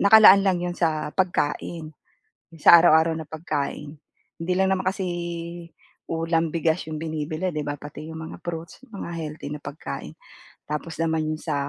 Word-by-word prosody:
nakalaan 200 -1 +9
lang 185 -2 +3
'yon 175 0 -3
sa 155 -3 0
pagkain, 170 -3 -1 0.7
sa 170 - +9
araw-araw 160 +1 +5
na 160 - -7
pagkain. 150 -2 -3 0.4
Hindi 165 +2 -1
lang 190 0 +3
naman 185 - -2
kasi 190 -1 -2 1.0
ulam, 165 -1 0
bigas 165 +1 +1
yung 155 - -4
binibili, 160 +2 -3
'di 150 - -1
ba, 145 - -2
pati 150 +1 -8
yung 160 - -7
mga - - -8
fruits, 165 +5 -6
mga 195 -3 -6
healthy 155 -2 -5
na 150 - -3
pagkain. 150 - -6 0.6
Tapos 150 +1 -4
naman, 160 -1 0
yung 155 - -1
sa 155 -4 -2
160 Hz, 160 wpm, -24 LUFS, 155-175 Hz, 1.0 s, nakalaan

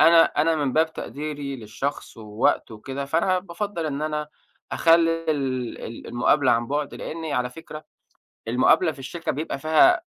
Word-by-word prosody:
أنا 165 0 +8
أنا 160 +2 +1
من 145 -3 0
باب 160 +2 +2
تقديري 145 -2 -5
للشخص 120 +6 -5
ووقته 110 +1 0
وكده، 135 +6 -5
فأنا 170 +6 +1
بافضل 180 -1 -4
إن 145 -1 -3
أنا 150 -1 -2 0.4
أخلي 165 0 +4
ال 130 -5 -2
ال 115 - -8
المقابلة 130 +3 +3
عن 115 0 +1
بُعد، 145 +2 -2
لأني- 160 -2 -5
على 125 0 0
فكرة- 155 +2 -10 0.6
المقابلة 130 +8 +4
في 145 - -13
الشركة 165 +5 -4
بيبقى 145 -1 -4
فيها 160 - +5
150 Hz, 155 wpm, -24 LUFS, 130-165 Hz, 0.6 s, أنا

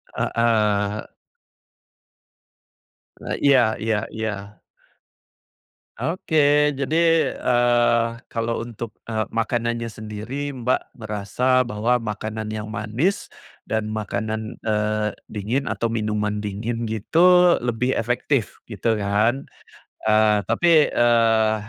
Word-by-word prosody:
Heeh. 105 -3 +1 2.2
E - - 0
iya 125 -6 +4
iya 110 -1 0
iya. 105 -2 -5 1.3
Oke, 150 -3 +2
jadi, 165 +4 +2
eee, 120 -1 +2 0.2
kalau 115 0 -2
untuk, 115 -1 -7 0.2
eee, 110 -1 -1
makanannya 115 +1 -1
sendiri 110 +7 -6
Mbak 125 0 -2
merasa 115 +4 0
bahwa 115 +2 +1
makanan 110 -1 -5
yang 105 0 -5
manis 110 - -2 0.3
dan 110 -1 -2
makanan, 110 0 -4
eee, 105 0 0 0.2
dingin 115 +7 -2
atau 115 - -1
minuman 105 -2 -1
dingin 110 +3 -3
gitu 175 - +4
lebih 125 +2 0
efektif 120 0 -1
gitu 115 - 0
kan. 105 +6 +1 0.6
Eee, 110 -1 +3
tapi, 155 +6 +4
eee, 115 -2 +3
115 Hz, 95 wpm, -22 LUFS, 105-125 Hz, 2.2 s, iya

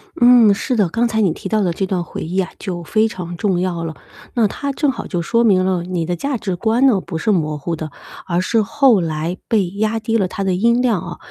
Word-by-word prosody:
嗯， 240 -4 +6
是 250 +5 -2
的， 200 -6 +2
刚 235 +5 +1
才 220 -1 0
你 185 -5 +3
提 - - -7
到 215 -1 +1
的 180 -3 +1
这 190 +3 -2
段 180 -2 -1
回 - - -7
忆 180 +4 -2
啊， 185 - -1
就 180 -4 -5
非 220 +6 +2
常 175 -4 -7
重 190 -5 0
要 175 -2 -2
了。 160 -1 -5 0.4
那 230 -4 +3
它 280 +7 -4
正 285 0 +1
好 - - -7
就 175 -3 -2
说 230 +7 +1
明 190 -4 +4
了， 185 -2 0
你 175 -2 -2
的 175 +1 -2
价 275 - -2
值 195 -5 -3
观 230 +7 +2
呢 210 -7 +3
不 165 - -6
是 220 - -1
模 155 -5 0
糊 165 +4 -3
的， 155 -1 -6 0.3
而 175 0 0
是 225 +4 +1
后 265 -3 +3
来 165 +2 -3
被 205 -5 +2
压 215 +3 -1
低 225 +1 0
了 190 -3 +1
它 195 - -4
的 190 -1 +1
音 235 +5 +2
量 230 -8 +2
啊。 175 -1 -7
195 Hz, 275 characters per minute, -19 LUFS, 175-225 Hz, 0.4 s, 嗯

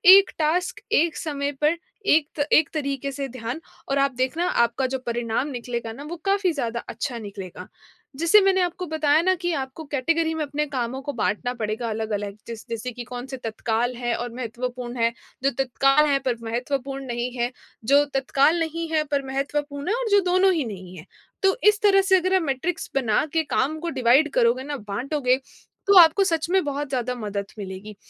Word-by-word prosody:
एक 395 -1 +5
टास्क 330 +4 0
एक 320 -1 +3
समय 285 -3 -2
पर 305 +3 +3 0.3
एक्त 310 -2 +2
एक 310 - +5
तरीके 280 -2 -2
से 275 0 -4
ध्यान 245 +2 -5 0.3
और 275 - +1
आप 275 0 +3
देखना, 260 +7 0
आपका 235 -5 +1
जो 265 +1 -3
परिणाम 235 +2 -1
निकलेगा 240 -3 -4
ना, 275 - -9
वो 315 +4 -6
काफ़ी 395 -2 +2
ज़्यादा 235 -5 -2
अच्छा 235 +2 -4
निकलेगा। 200 -4 -8 0.5
जैसे 335 +7 +6
मैंने 385 -1 +3
आपको 360 +1 -2
बताया 310 -1 +3
ना 375 +1 +4
कि 350 0 0
आपको 270 +1 -4
कैटेगरी 320 +4 +1
में 315 - -1
अपने 295 +1 -2
कामों 260 -1 -3
को 285 +1 -4
बाँटना 240 +1 -1
पड़ेगा 225 +1 -3
अलग-अलग, 210 -2 -3
जैस 230 -2 -7
जैसे 230 +2 -4
कि 245 0 -7
कौन-से 255 +2 -6
तत्काल 230 +1 -2
हैं 240 -1 -1
और 240 0 -4
महत्वपूर्ण 245 0 -5
हैं, 230 0 +2 0.3
जो 275 - +3
तत्काल 275 +3 +3
हैं 280 -1 +2
पर 245 -2 0
महत्वपूर्ण 270 +4 -3
नहीं 240 0 -3
हैं, 240 +1 0 0.3
जो 280 +4 +5
तत्काल 275 +4 +3
नहीं 330 0 -2
हैं 310 -1 +2
पर 280 -1 +1
महत्वपूर्ण 285 +1 -3
हैं, 430 - +2
और - - -2
जो 405 - +7
दोनों 375 +1 +5
ही 315 -6 0
नहीं 185 -4 -8
है। 160 - -10 0.4
तो 385 0 +4
इस 420 +1 0
तरह 395 -2 +5
से 380 - +8
अगर 370 +1 +1
हम 375 - +2
मैट्रिक्स 310 +5 -2
बना 240 -4 +2
के 325 -1 +2
काम 305 +4 +1
को 340 +1 -3
डिवाइड 265 +6 +5
करोगे 245 +1 +3
ना, 290 +1 -4
बाँटोगे, 255 +5 0 0.5
तो 400 - +6
आपको 340 +3 +8
सच 330 -3 0
में 380 0 +3
बहुत 285 0 -3
ज़्यादा 250 -2 -1
मदद 205 -4 -4
मिलेगी। 195 +2 -7
275 Hz, 190 wpm, -24 LUFS, 240-315 Hz, 0.5 s, से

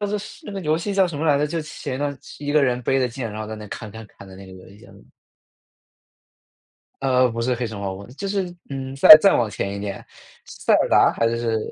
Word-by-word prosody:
就 205 - -1
是 210 +1 -2
是 205 - -12
那 210 - -7
个 195 - -4
游 155 0 0
戏 200 +4 -4
叫 195 -1 +3
什 165 -5 -6
么 160 - -2
来 145 -2 +4
着， 150 - +1
就 165 +2 -3
前 155 -4 -6
一 - - -8
段 145 0 -1
时 - - -13
一 145 - -2
个 150 -1 +4
人 125 -2 0
背 135 +3 +1
着 130 - +1
剑， 120 -1 -6
然 105 +1 -7
后 - - -7
在 110 - -6
那 105 0 -9
砍 110 +1 -8
砍 110 +1 -11
砍 100 - -16
的 95 - -13
那 95 0 -12
个 95 - -13
游 95 0 -14
戏， 100 - -17
叫 - - -17
什 - - -17
么？ - - -20 2.0
呃， 130 -2 +3
不 115 +1 -5
是 125 +2 0
《黑 120 - -2
神 110 -2 -8
话： 100 -1 -4
悟 95 - -9
空》， 100 - -11
就 200 - -5
是， 190 -3 -3 0.2
嗯， 135 -1 -6
再 140 - +11
再 195 - +4
往 115 -3 0
前 100 -1 -4
一 - - -6
点， 100 -1 -6 0.4
塞 - - -2
尔 - - +2
达 - - +4
还 115 - 0
是 115 -1 -1
130 Hz, 305 characters per minute, -22 LUFS, 110-155 Hz, 2.0 s, 再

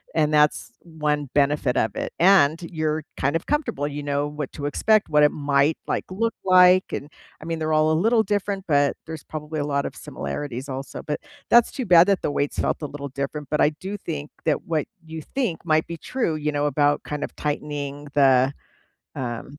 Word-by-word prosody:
and 155 -1 +2
that's 150 0 +2
one 150 -4 -2
benefit 145 -2 +2
of 110 -2 0
it. - - -3
And 170 -4 +5
you're 155 -2 -2
kind 140 +4 +1
of 165 - -10
comfortable, 290 - -1
you 145 0 -5
know 145 0 -1
what 150 -2 -5
to 145 - -6
expect, 215 +9 +2
what 150 -1 +4
it 150 - +6
might, 145 +1 +1
like, - - -1
look 225 +5 -1
like, 185 0 +5
and, 145 - -5 0.3
I - - -9
mean, 165 0 -3
they're 155 0 -1
all 155 0 +3
a - - +3
little 220 +8 +3
different, 200 -2 -2
but 145 -3 +2
there's 160 -2 -7
probably 155 0 -6
a - - -1
lot 140 -1 0
of - - -5
similarities 125 - -5
also, 135 0 -6
but 150 - -3 0.3
that's 240 -1 +5
too 255 - -4
bad 175 -1 +7
that 200 -3 +2
the - - -1
weights 145 0 -2
felt - - 0
a 150 - -3
little 140 0 -7
different, 140 +2 -5
but 150 - +1
I - - +5
do 185 +6 -7
think 150 -6 -5
that 155 -3 0
what 155 -3 -1 0.2
you 160 0 -7
think 230 - -3
might 155 -1 +2
be 170 - -5
true, 170 - -2
you 150 0 -1
know, 145 0 0
about 145 0 +2
kind 150 -1 -4
of - - -5
tightening 145 -1 -4
the, 135 -2 +4 0.6
um, 125 +3 -5
150 Hz, 210 wpm, -23 LUFS, 145-165 Hz, 0.6 s, bad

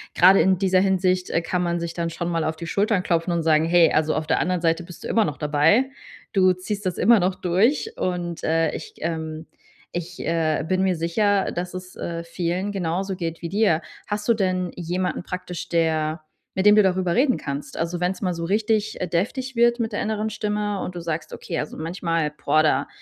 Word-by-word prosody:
gerade 190 +2 +7
in 190 0 +3
dieser 185 0 +3
Hinsicht, 185 -1 +1
äh, 165 - +1
kann 180 +2 -1
man 170 0 0
sich 170 -1 -4
dann 170 -1 -2
schon 170 +1 -3
mal 165 -2 0
auf 160 0 -1
die 170 +1 -7
Schultern 200 0 +1
klopfen 170 0 0
und 170 -1 0
sagen: 155 -1 +3
„Hey, 170 0 +5
also, 155 0 +2
auf 155 - -1
der 160 - +2
anderen 180 -1 0
Seite 165 +1 +1
bist 175 0 -12
du - - -5
immer 225 - +3
noch 150 -2 -3
dabei. 160 - +3 0.4
Du 185 -2 +5
ziehst 200 +3 -5
das 180 - -1
immer 230 +3 +5
noch 185 0 +1
durch.“ 225 - +1
Und, 175 -2 -3
äh, 165 -1 +2
ich, - - -8
ähm 160 -1 -4 0.5
ich, 175 +1 -5
äh, 160 -2 +1
bin 185 0 +1
mir 190 -1 +2
sicher, 195 +4 +1
dass 180 +1 -4
es, 185 0 -8
äh, 170 -1 -4
vielen 175 +3 -2
genauso 190 +1 -2
geht 165 -2 -5
wie 170 - -3
dir. 200 -5 +2 0.3
Hast 210 0 -3
du 235 - +5
denn 185 -4 0
jemanden 180 +1 -2
praktisch, 180 -1 -6
der 160 -1 0 0.3
mit 190 - 0
dem 210 0 +8
du 215 - +7
darüber 185 -2 +1
reden 255 +1 +3
kannst? 140 0 -6
Also, 170 +1 -2
wenn's 180 +2 -1
mal 185 -3 0
so 165 - -4
richtig, 215 +2 0
äh, 180 - -1
deftig 245 +10 -2
wird 235 +1 +3
mit 225 -2 -2
der - - -1
inneren 215 0 -1
Stimme 210 -1 -2
und 180 - -5
du 175 - -4
sagst: 165 -1 -4
„Okay, 170 - -4
also, 150 - -5
manchmal, 165 -2 -1
boah, 150 +1 +2
da 155 - +2
180 Hz, 215 wpm, -23 LUFS, 165-195 Hz, 0.5 s, dem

